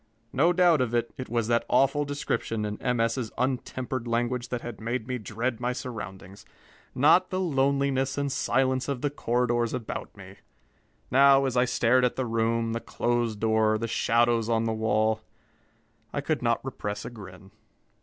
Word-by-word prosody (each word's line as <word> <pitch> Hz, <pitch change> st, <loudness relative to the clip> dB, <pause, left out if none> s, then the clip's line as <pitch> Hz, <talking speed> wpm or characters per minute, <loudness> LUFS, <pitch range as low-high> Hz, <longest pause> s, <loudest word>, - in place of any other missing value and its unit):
No 160 Hz, +7 st, +4 dB
doubt 175 Hz, -4 st, +4 dB
of 120 Hz, -1 st, 0 dB
it, 120 Hz, 0 st, -1 dB
it 130 Hz, -, -7 dB
was 115 Hz, -1 st, 0 dB
that 115 Hz, 0 st, +2 dB
awful 140 Hz, +2 st, +3 dB
description 115 Hz, -6 st, -2 dB
in 105 Hz, 0 st, -5 dB
M. 125 Hz, -2 st, 0 dB
S.'s 115 Hz, 0 st, 0 dB
untempered 130 Hz, -1 st, -2 dB
language 120 Hz, +1 st, -1 dB
that 125 Hz, -1 st, -3 dB
had 120 Hz, -3 st, -8 dB
made 115 Hz, +1 st, -3 dB
me 125 Hz, -1 st, -3 dB
dread 115 Hz, +3 st, -3 dB
my 125 Hz, +1 st, -1 dB
surroundings, 100 Hz, -6 st, -8 dB, 0.5 s
not 160 Hz, +7 st, +5 dB
the 185 Hz, -, -2 dB
loneliness 140 Hz, -4 st, +1 dB
and 140 Hz, -1 st, -1 dB
silence 130 Hz, 0 st, +1 dB
of 140 Hz, -3 st, -3 dB
the 145 Hz, -, 0 dB
corridors 120 Hz, -3 st, 0 dB
about 115 Hz, -3 st, -6 dB
me. 95 Hz, 0 st, -12 dB, 0.7 s
Now, 135 Hz, +1 st, +6 dB
as 130 Hz, -2 st, -1 dB
I 125 Hz, 0 st, +4 dB
stared 125 Hz, 0 st, +2 dB
at 125 Hz, -, +1 dB
the 130 Hz, -, -1 dB
room, 115 Hz, 0 st, 0 dB
the 115 Hz, -, -2 dB
closed 120 Hz, -3 st, -1 dB
door, 110 Hz, 0 st, +2 dB
the 115 Hz, +1 st, -3 dB
shadows 115 Hz, 0 st, +2 dB
on 115 Hz, -1 st, +2 dB
the 115 Hz, 0 st, 0 dB
wall, 110 Hz, 0 st, +1 dB, 0.9 s
I -, -, -2 dB
could -, -, -1 dB
not -, -, 0 dB
repress 105 Hz, 0 st, -5 dB
a -, -, -6 dB
grin. 95 Hz, -3 st, -12 dB
120 Hz, 175 wpm, -27 LUFS, 115-130 Hz, 0.9 s, Now